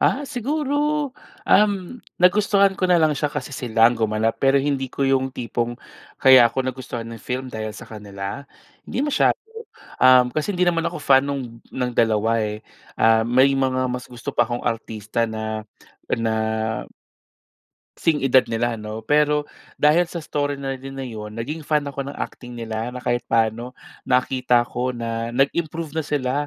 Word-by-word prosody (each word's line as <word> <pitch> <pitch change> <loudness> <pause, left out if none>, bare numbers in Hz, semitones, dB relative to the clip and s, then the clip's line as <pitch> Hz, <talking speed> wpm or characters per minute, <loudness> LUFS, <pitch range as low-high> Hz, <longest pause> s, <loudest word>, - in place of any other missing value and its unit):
Ah 280 - +2
siguro, 290 +3 -1 0.4
uhm, 205 +2 +3 0.2
nagustuhan 200 +1 +4
ko - - 0
na 180 - +5
lang 155 -1 +4
siya 150 - 0
kasi 145 -1 -4
silang 115 -1 +3
gumanap 110 0 0
pero 135 0 +4
hindi 135 -2 -1
ko 140 - -1
yung 135 -1 +1
tipong 120 0 -3 0.4
kaya 130 -3 +8
ko 130 - -1
nagustuhan 125 -3 -5
'yong 115 -1 -9
film 130 +1 -3
dahil 110 -2 -5
sa - - -11
kanila. 100 +4 -7 0.4
'Di - - -3
masyado, 295 - +2 0.6
uhm, 130 -1 +7
kasi 155 +6 -1
hindi 180 - +2
naman 165 -1 0
ako 175 +1 -3
fan 135 0 +4
nung 125 -5 -5
ng 125 -1 -2
dalawa 110 0 +2
eh. 105 0 -3 0.4
Ah 110 0 +4
may 130 +3 +4
mga 130 -1 +1
mas 125 0 -4
gusto 120 -1 -6
pa 120 - +3
akong 120 0 -4
artista 110 0 -2
na 110 0 -4 0.5
na, 115 -1 +1 1.6
'sing 155 -4 +1
edad 130 -1 +4
nila 115 0 -1
ano. 110 +1 -6
Pero 150 0 +2 0.3
dahil 160 +4 +4
sa 170 -1 -6
story 145 -1 -1
na 135 -1 -4
din 135 +1 -9
na 135 - -5
yun 110 -4 -7
naging 145 +7 -5
fan 150 -1 +2
ako 140 -1 -5
ng 140 - -6
acting 125 -1 -7
nila 115 +1 -4
na 125 - -7
kahit 120 0 -1
paano 115 +2 0 0.3
nakita 125 -1 +2
ko 125 +1 -2
na 115 0 -4
nag-improve 155 +4 0
na 160 - 0
sila 130 -4 -1
130 Hz, 165 wpm, -22 LUFS, 115-150 Hz, 1.6 s, kaya